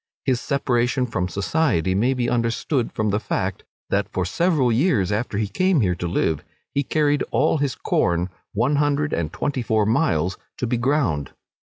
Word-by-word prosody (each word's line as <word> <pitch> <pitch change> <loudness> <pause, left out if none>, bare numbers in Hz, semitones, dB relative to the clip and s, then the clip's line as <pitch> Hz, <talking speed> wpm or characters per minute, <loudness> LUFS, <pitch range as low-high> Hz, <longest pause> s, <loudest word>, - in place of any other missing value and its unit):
His 130 -1 +1
separation 125 -2 +1
from 90 -7 -2
society 100 - 0
may 120 +7 +2
be 125 -1 0
understood 115 +2 0
from 110 -1 -1
the 105 - +1
fact, 95 -3 -2 0.3
that, 100 +1 +1
for 90 - -1
several 145 - +2
years 115 - +2
after 105 0 -1
he 105 -1 0
came 185 - +2
here 90 -4 +2
to 90 0 -4
live, 80 -3 0 0.3
he 140 - +2
carried 145 0 +1
all 160 - +2
his 140 -3 0
corn 85 +1 0 0.2
one 125 +8 +1
hundred 145 0 +1
and 80 -2 -1
twenty 140 -3 -2
four 110 -2 +1
miles 95 - +1 0.2
to - - -2
be 120 +1 0
ground. 120 - 0
120 Hz, 175 wpm, -23 LUFS, 95-140 Hz, 0.3 s, may